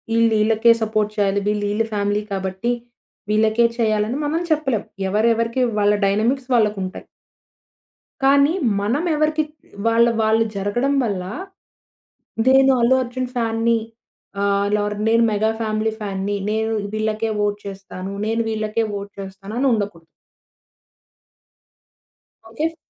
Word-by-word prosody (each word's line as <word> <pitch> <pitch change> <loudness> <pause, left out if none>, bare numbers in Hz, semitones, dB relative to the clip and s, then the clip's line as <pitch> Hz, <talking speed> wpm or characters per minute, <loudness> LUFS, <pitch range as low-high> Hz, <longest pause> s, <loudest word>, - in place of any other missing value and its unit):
ఈళ్ళు, 230 -1 +4
ఈళ్ళకే 225 +2 +4
సపోర్ట్ 215 -1 0
చేయాలి. 200 -1 +2
వీళ్ళు 210 0 0
ఈళ్ళ 220 +2 +1
ఫ్యామిలీ 205 0 0
కాబట్టి, 190 +4 -2 0.6
వీళ్ళకే 220 +2 +3
చేయాలి, 215 -2 +2
అని 260 - -2
మనం 315 +3 0
చెప్పలేం. 275 -9 +1 0.3
ఎవరు 215 +3 +2
ఎవరికి 230 +3 0 0.2
వాళ్ళ 205 0 +4 0.2
డైనమిక్స్ 240 +6 0
వాళ్ళకుంటాయి. 205 -4 0 1.2
కానీ 280 +3 +5 0.3
మనం 230 +10 0
ఎవరికి 305 +1 +1 0.4
వాళ్ళ 230 +1 +5 0.2
వాళ్ళు 220 +1 +3
జరగడం 240 +8 0
వల్ల 200 -6 -2 1.2
నేను 265 0 +6
'అల్లు 240 +2 +4
అర్జున్' 250 +1 -4
ఫ్యాన్‌న్ని 230 0 +1 0.6
ఆహ్, 200 0 +1
లోర్ 210 0 -1
నేను 230 +1 +4
'మెగా 215 +1 +1
ఫ్యామిలీ' 215 0 -1
ఫ్యాన్‌‌న్ని 200 0 -2 0.2
నేను 220 +1 0 0.2
వీళ్ళకే 215 +1 -1
వోట్ 205 0 0
చేస్తాను. 195 -1 -7 0.2
నేను 225 +1 0
వీళ్ళకే 215 +1 -1
వోట్ 200 0 -6
చేస్తాను 195 +2 -9
అని 275 - +2
ఉండకూడదు. 200 -6 -3 2.4
ఓకే‌ 230 +8 -2
ఫ్ - - -21
220 Hz, 125 wpm, -21 LUFS, 205-235 Hz, 2.4 s, నేను